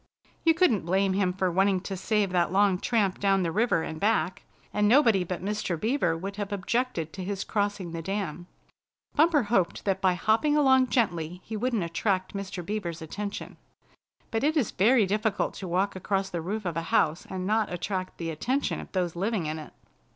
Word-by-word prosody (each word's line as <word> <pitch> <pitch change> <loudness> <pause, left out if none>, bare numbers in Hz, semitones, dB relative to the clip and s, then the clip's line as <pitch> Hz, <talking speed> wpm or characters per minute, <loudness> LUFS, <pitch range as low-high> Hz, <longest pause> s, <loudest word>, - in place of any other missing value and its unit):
You 325 -1 +4
couldn't 275 - +3
blame 190 +2 +2
him 190 -1 +1
for 185 0 0
wanting 190 +1 +3
to 195 0 -5
save 200 +1 0
that 175 -2 +1
long 195 -1 +3
tramp 200 -5 +1
down 195 -1 +2
the 165 - -1
river 215 -4 +2
and 160 0 -5
back, 210 -2 +1 0.3
and 210 0 +2
nobody 230 -6 +5
but 180 +1 -5
Mr. 205 -5 -2
Beaver 215 - +1
would 195 +4 -6
have 205 -1 -4
objected 200 -4 -1
to 190 - -6
his 195 +1 -3
crossing 205 -4 -2
the 165 0 -4
dam. 180 -2 -4 0.7
Bumper 305 -2 +4
hoped 200 -5 0
that 195 -1 0
by 185 -2 +3
hopping 230 - +2
along 265 -3 +5
gently 180 - 0
he 220 - -6
wouldn't 230 -2 0
attract 185 +3 -1
Mr. 195 -3 -5
Beaver's 170 -5 -4
attention. 205 +5 -6 0.7
But 225 +1 -1
it 310 +2 +2
is 255 -9 +1
very 220 +3 +4
difficult 210 +1 0
to 190 - -6
walk 190 +3 0
across 195 +1 -1
the 170 -2 -3
roof 205 +5 -4
of 175 -3 -2
a - - 0
house 160 +2 +2
and 185 -1 -4
not 215 0 +1
attract 185 +1 -3
the 165 -1 -3
attention 255 - -1
of - - -10
those 180 -3 -1
living 195 0 -1
in 155 +1 -3
it. 155 - -10
195 Hz, 195 wpm, -27 LUFS, 180-215 Hz, 0.7 s, nobody